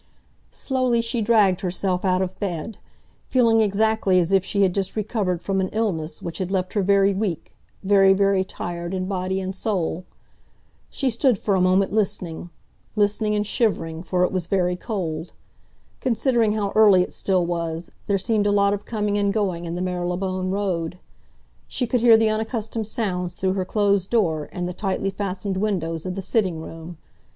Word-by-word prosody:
Slowly 255 -3 0
she 230 0 -1
dragged 205 -5 +3
herself 185 -1 -1
out 185 -1 +2
of 185 0 -6
bed, 195 +1 -4 0.5
feeling 230 -3 +4
exactly 210 -2 +2
as 175 +1 0
if 195 -2 +4
she 200 +1 +1
had 185 -2 +2
just 195 -1 -2
recovered 205 -5 -1
from 195 -1 0
an 190 - 0
illness 185 -8 -2
which 170 -1 -5
had 185 -1 -2
left 185 -1 -1
her 205 - +1
very 200 +1 +3
weak, 190 -5 -3 0.3
very, 195 0 +5
very 195 0 +3
tired 175 -1 -5
in 185 0 -2
body 190 0 -2
and 190 0 -4
soul. 185 -4 -2 0.9
She 270 -3 -1
stood 235 0 +2
for 200 - -1
a 190 - +2
moment 185 +2 +3
listening—listening, 205 +3 -2
and 210 0 0
shivering, 165 -7 -1
for 180 0 0
it 180 - +1
was 185 -3 -2
very 180 -2 +1
cold. 175 -6 -4 0.7
Considering 235 -3 +1
how 205 -2 -1
early 205 -4 +6
it - - -8
still 185 -3 +1
was, 170 -1 -3 0.2
there 200 - +2
seemed 205 +1 +1
a - - +3
lot 200 0 +3
of 205 0 -4
coming 210 -2 -1
and 200 -1 +2
going 190 -5 -1
in 170 0 -4
the 180 - -2
Marylebone 185 +1 -2
Road. 180 -4 -2 0.7
She 250 - -2
could 240 0 0
hear 230 -2 +7
the 220 -1 +2
unaccustomed 220 0 -3
sounds 180 -6 -2
through 190 0 0
her 190 -1 -2
closed 200 -1 +1
door 165 -10 +1
and 180 -1 -3
the 180 - -4
tightly 195 +1 -2
fastened 195 0 -3
windows 180 -5 -2
of 180 - -3
the 195 - -4
sitting 190 -4 0
room. 165 +1 -9
195 Hz, 180 wpm, -23 LUFS, 180-210 Hz, 0.9 s, hear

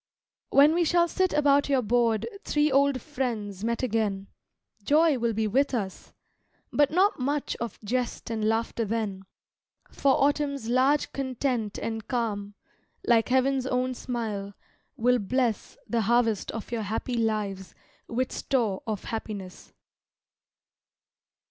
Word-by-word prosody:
When 290 +3 +6
we 345 +1 +2
shall 340 +1 +3
sit 370 +2 +1
about 285 -1 +3
your 270 -3 +2
board 230 0 +1 0.2
Three 295 0 +1
old 275 0 +3
friends 225 -9 -3
met 235 +2 -1
again, 210 -5 -1 0.5
Joy 300 +1 +4
will 235 -1 0
be 220 +1 0
with 265 +6 +1
us, 195 -5 -5 0.6
but 290 -1 +4
not 375 +3 +2
much 280 +3 -1
Of 235 -3 -5
jest 240 +1 -2
and 220 -1 -2
laughter 225 +1 0
then; 205 -3 -3 0.7
For 275 -1 +2
Autumn's 280 -3 +1
large 265 +4 +2
content 255 -5 -2
and 225 -2 -4
calm, 205 -4 -2 0.5
Like 230 -1 +3
heaven's 260 0 +2
own 255 0 0
smile, 215 -6 -4 0.4
will 250 +2 +3
bless 235 +2 -1
The 235 -1 0
harvest 225 -1 +1
of 225 0 -6
your 235 -2 -1
happy 220 +4 -3
lives 210 -5 -2 0.3
With 255 +2 -1
store 225 -8 -1
of 215 -3 -3
happiness. 205 -5 -6
240 Hz, 130 wpm, -27 LUFS, 220-275 Hz, 0.7 s, When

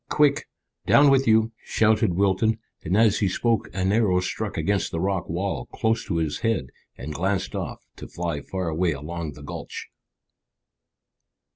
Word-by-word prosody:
Quick! 145 -2 +3 0.4
Down 145 -1 +6
with 135 0 +3
you!" 110 0 +4
shouted 110 -4 +2
Wilton, 100 +3 +2 0.3
and 90 +5 +1
as 110 -2 +4
he 100 - +2
spoke 115 +4 0
an 95 0 0
arrow 105 -4 +3
struck 90 - -3
against 100 -1 0
the 80 - -2
rocky 95 -2 -1
wall 95 +3 -2
close 115 0 0
to 90 - -2
his 80 -3 -1
head 110 - 0 0.3
and 75 +4 -6
glanced 95 +3 -1
off, - - -5
to - - -8
fly 85 -4 -3
far 95 -2 -4
away 85 +1 +1
along 75 +2 -5
the 75 - -12
gulch. 70 - -7
95 Hz, 160 wpm, -24 LUFS, 85-110 Hz, 0.4 s, Down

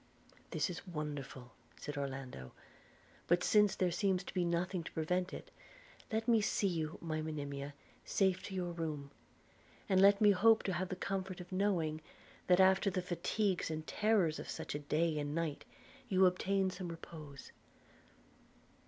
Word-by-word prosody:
'This 185 - -1
is 180 +2 -8
wonderful,' 145 -6 -5 0.3
said 145 - -6
Orlando; 135 - -5 0.7
'but 175 +1 +3
since 210 -2 +4
there 180 -2 +1
seems 185 +1 +1
to - - -8
be 180 - +1
nothing 175 +1 -1
to - - -8
prevent 180 +3 0
it, - - -8 0.6
let 225 +1 -1
me 230 -2 +5
see 205 - 0
you, 160 -4 -1
my 155 -2 -2
Monimia, 145 -2 -5 0.3
safe 190 -2 +1
to 195 - -6
your 180 -2 -2
room; 155 -4 -4 0.8
and 190 -1 +4
let 200 +1 +7
me 210 -1 +7
hope 220 +3 +5
to 190 - -1
have 180 +2 -2
the - - -3
comfort 190 0 -3
of 180 +1 -10
knowing, 175 -5 0 0.5
that 180 0 +5
after 190 +1 +5
the 185 -1 -2
fatigues 180 +2 0
and 155 0 -4
terrors 205 -8 +2
of - - -7
such - - -5
a 145 - -2
day 155 +2 0
and 145 0 -3
night, 165 -3 -2 0.4
you 190 -1 +5
obtain 190 +1 +2
some 185 -1 -6
repose.' 155 -4 -9
175 Hz, 160 wpm, -35 LUFS, 155-190 Hz, 0.8 s, let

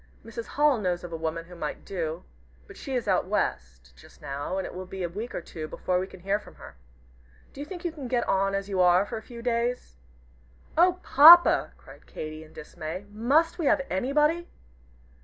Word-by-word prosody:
Mrs. 230 0 -7
Hall 290 -4 +2
knows 180 -3 -2
of 175 -1 -8
a - - -2
woman 165 +1 -4
who 180 - -14
might 150 -3 -6
do, 165 -3 -4 0.4
but - - -14
she 270 - -5
is 245 - -2
out - - +1
West, 60 -1 -3
just - - -18
now, 145 +5 -4
and 190 - -2
it - - -7
will 185 0 -7
be 190 0 -6
a 175 - -2
week 215 +8 -6
or - - -3
two 155 -2 -7
before 180 +3 -1
we 185 - -3
can 190 -2 -14
hear 195 +3 0
from - - -16
her. 70 - -12 0.8
Do 280 - -8
you - - -5
think 355 0 -8
you 345 - 0
can 290 -5 -8
get 245 -1 0
on 195 +1 +1
as 195 0 -3
you 195 -2 -2
are 180 +2 +5
for 230 - -6
a - - -7
few 235 +1 -11
days?" 240 - -2 0.8
"Oh, 360 +2 +4
Papa!" 335 +5 +8
cried - - -16
Katy, 155 0 -7
in 155 - -17
dismay, 160 +5 -7
"must 280 - +1
we 315 - 0
have 275 - +3
anybody?" 300 - +1
195 Hz, 215 wpm, -27 LUFS, 170-260 Hz, 0.8 s, Papa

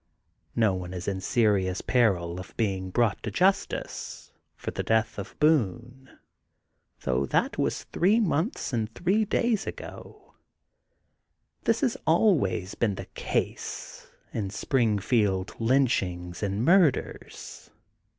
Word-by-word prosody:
No 110 -4 +3
one 90 0 -5
is 90 - -6
in 95 -1 -2
serious 100 -4 +1
peril 90 -8 +1
of 90 - -11
being 95 -4 -1
brought 110 +1 +1
to - - -3
justice 190 +2 -1 0.2
for - - -5
the - - -3
death 110 -1 +1
of 100 +3 -8
Boone, 130 - 0 0.8
though 65 +2 0
that - - 0
was - - 0
three 200 +6 +2
months 185 - -1
and 110 -2 -1
three 195 - +2
days 225 0 0
ago. - - -9 1.3
This 230 0 +2
has 250 -4 +1
always 155 - +2
been, 105 -4 0
the - - -7
case, - - -4 0.3
in 100 -4 -2
Springfield 105 -4 +1
lynchings 100 -9 +1
and 100 +3 -1
murders. 175 -4 +1
110 Hz, 120 wpm, -27 LUFS, 95-150 Hz, 1.3 s, No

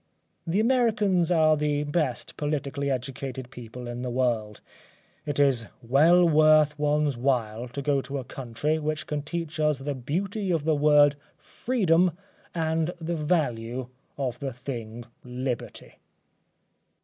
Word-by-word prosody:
The 175 +5 +1
Americans 215 -7 +2
are 155 -2 +5
the 150 -1 0
best 145 -4 -2
politically 140 -2 -2
educated 130 -1 -4
people 125 0 -9
in 120 0 -5
the 125 - -3
world. 120 -4 -1 0.7
It 145 -1 -2
is 130 -6 +3 0.2
well 160 +9 +5
worth 155 -1 +5
oneŌĆÖs 150 -2 +1
while 120 -2 0
to 140 +3 -6
go 140 -1 +2
to 140 +1 -5
a 135 - -4
country 135 +5 -2
which 155 0 -2
can 150 -1 -3
teach 160 +1 -5
us 150 -2 +2
the 140 +2 -3
beauty 190 - -3
of 165 -4 +1
the 160 - +3
word 145 -1 +5 0.2
FREEDOM 180 -8 +1 0.4
and 160 +1 0
the 170 +1 -3
value 130 -7 -1 0.3
of 130 -4 -3
the 135 -3 -4
thing 120 -2 -6 0.2
LIBERTY. 125 -1 -5
145 Hz, 135 wpm, -26 LUFS, 125-160 Hz, 0.7 s, are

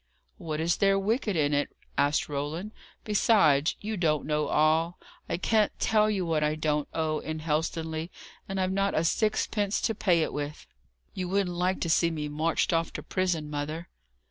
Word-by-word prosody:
"What 155 -4 -4
is 165 +2 +1
there 195 0 +3
wicked 210 +1 0
in 150 -2 +2
it?" 145 0 -1 0.2
asked 145 +2 +2
Roland. 150 +8 -4 0.3
"Besides, 195 -9 +3
you 215 +1 -3
don't 155 -4 +1
know 150 0 0
all. 160 +4 +2 0.3
I - - 0
can't 215 +3 +2
tell 215 -1 +3
you 195 -4 0
what 160 -2 +1
I 150 0 +1
don't 150 -1 0
owe 155 -1 -1
in 160 0 -4
Helstonleigh, 160 +1 -2 0.4
and 195 0 -2
I've 185 0 +1
not 195 +1 0
a 155 - +2
sixpence 210 +2 +1
to 225 - +1
pay 175 -6 +2
it - - -3
with. 145 0 -5 0.5
You 180 -1 -4
wouldn't 190 -2 0
like 180 +2 0
to 170 - -1
see 170 0 +3
me 150 -2 -4
marched 160 +5 0
off 165 0 +1
to - - -6
prison, 180 -5 -1
mother." 150 +3 -4
165 Hz, 180 wpm, -28 LUFS, 155-195 Hz, 0.5 s, there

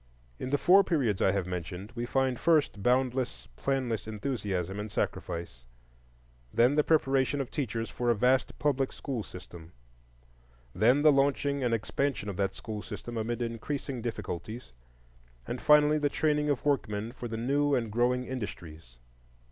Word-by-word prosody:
In - - -4
the 145 - +2
four 190 +6 +6
periods 130 - 0
I - - +4
have 100 -2 -1
mentioned, 90 +3 -5
we 120 0 -4
find 130 -2 +1
first, 155 -11 +2
boundless, 125 +2 0
planless 130 - -1
enthusiasm 105 -5 -3
and 105 0 -5
sacrifice; 85 -12 -3 0.9
then 120 +4 +4
the 150 0 +3
preparation 135 -3 +2
of 135 - -3
teachers 115 -5 -2
for 120 -1 -2
a 120 - +4
vast 130 +4 +2
public 135 -3 +1
school 130 -5 -4
system; 85 -4 -11 1.0
then 125 +8 +4
the 155 - +8
launching 140 0 +1
and 120 - +1
expansion 115 +1 -1
of 95 - -5
that 95 -1 0
school 110 -2 -6
system 120 +2 -7
amid 115 +2 -2
increasing 125 +3 -4
difficulties; 110 - -5 0.7
and - - -5
finally 150 0 +5
the 145 -1 +1
training 150 0 +1
of 145 -1 -1
workmen 115 -6 0
for 120 -1 -7
the 115 -1 -4
new 140 +4 +2
and 115 -3 -1
growing 125 +3 +2
industries. 85 - -7
120 Hz, 155 wpm, -29 LUFS, 105-140 Hz, 1.0 s, the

